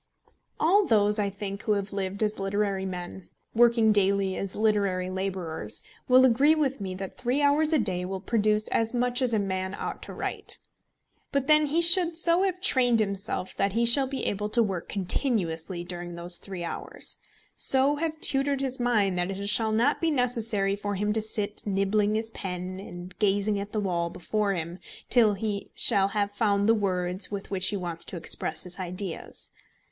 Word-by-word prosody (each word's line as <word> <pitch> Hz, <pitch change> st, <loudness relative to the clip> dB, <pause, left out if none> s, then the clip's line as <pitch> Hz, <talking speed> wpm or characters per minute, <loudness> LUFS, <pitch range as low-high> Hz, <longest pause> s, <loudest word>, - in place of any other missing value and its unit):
All 385 Hz, +7 st, +4 dB
those 210 Hz, -2 st, +2 dB
I 200 Hz, -1 st, 0 dB
think 200 Hz, 0 st, -6 dB
who 215 Hz, -, 0 dB
have 200 Hz, -1 st, -3 dB
lived 195 Hz, +1 st, -3 dB
as 210 Hz, -1 st, -1 dB
literary 195 Hz, -1 st, -1 dB
men, 180 Hz, 0 st, -7 dB, 0.2 s
working 230 Hz, -1 st, +4 dB
daily 195 Hz, -2 st, +1 dB
as 195 Hz, -1 st, -5 dB
literary 200 Hz, -4 st, 0 dB
labourers, 180 Hz, -, -4 dB, 0.2 s
will 255 Hz, 0 st, +6 dB
agree 270 Hz, +6 st, +4 dB
with 275 Hz, -6 st, -1 dB
me 190 Hz, -2 st, -4 dB
that 190 Hz, 0 st, -8 dB
three 250 Hz, +3 st, 0 dB
hours 300 Hz, +2 st, +3 dB
a 315 Hz, -, +4 dB
day 185 Hz, -7 st, -1 dB
will 190 Hz, +1 st, -4 dB
produce 215 Hz, +1 st, +1 dB
as 225 Hz, +2 st, 0 dB
much 245 Hz, +1 st, 0 dB
as 250 Hz, -2 st, +1 dB
a 220 Hz, -, +2 dB
man 190 Hz, -1 st, -2 dB
ought -, -, -6 dB
to -, -, -8 dB
write. -, -, -2 dB, 0.7 s
But 280 Hz, -1 st, 0 dB
then 305 Hz, +1 st, +4 dB
he 325 Hz, +4 st, +1 dB
should 340 Hz, -1 st, +6 dB
so 335 Hz, +1 st, +3 dB
have 375 Hz, -2 st, 0 dB
trained 245 Hz, -, +4 dB
himself 200 Hz, -3 st, -3 dB
that 195 Hz, -1 st, 0 dB
he 235 Hz, +2 st, +1 dB
shall 265 Hz, +3 st, +8 dB
be 270 Hz, 0 st, -4 dB
able 210 Hz, +1 st, -2 dB
to 235 Hz, +2 st, +3 dB
work 190 Hz, -5 st, -4 dB
continuously 185 Hz, -, 0 dB
during 175 Hz, 0 st, -5 dB
those 175 Hz, +1 st, -2 dB
three 190 Hz, -3 st, -6 dB
hours, 170 Hz, -, -3 dB, 0.4 s
so 270 Hz, +2 st, +3 dB
have 315 Hz, 0 st, -3 dB
tutored 275 Hz, -1 st, +2 dB
his 265 Hz, -1 st, -3 dB
mind 210 Hz, -7 st, +1 dB
that 175 Hz, +1 st, -1 dB
it 195 Hz, +1 st, -5 dB
shall 220 Hz, +1 st, +2 dB
not 235 Hz, +7 st, +1 dB
be 330 Hz, -, +2 dB
necessary 230 Hz, -7 st, 0 dB
for 205 Hz, 0 st, -4 dB
him 210 Hz, +2 st, -1 dB
to 220 Hz, -, 0 dB
sit 210 Hz, -1 st, -3 dB
nibbling 205 Hz, +2 st, +1 dB
his 225 Hz, +1 st, -2 dB
pen, 185 Hz, -1 st, -5 dB
and 180 Hz, -1 st, -10 dB
gazing 205 Hz, 0 st, +1 dB
at 200 Hz, +1 st, -6 dB
the 215 Hz, -, -2 dB
wall 175 Hz, -4 st, -1 dB
before 205 Hz, +3 st, -2 dB
him, 170 Hz, +1 st, -5 dB, 0.3 s
till 225 Hz, -4 st, +5 dB
he 205 Hz, 0 st, -4 dB
shall 195 Hz, -1 st, +3 dB
have 205 Hz, 0 st, -1 dB
found 205 Hz, -1 st, +1 dB
the 225 Hz, -, +5 dB
words 185 Hz, -3 st, 0 dB
with 200 Hz, -1 st, -6 dB
which 185 Hz, -1 st, +2 dB
he 205 Hz, -, +1 dB
wants 170 Hz, -3 st, -5 dB
to 185 Hz, -, -6 dB
express 160 Hz, -1 st, +1 dB
his 180 Hz, +1 st, -7 dB
ideas. 180 Hz, -1 st, -5 dB
205 Hz, 190 wpm, -26 LUFS, 190-240 Hz, 0.7 s, shall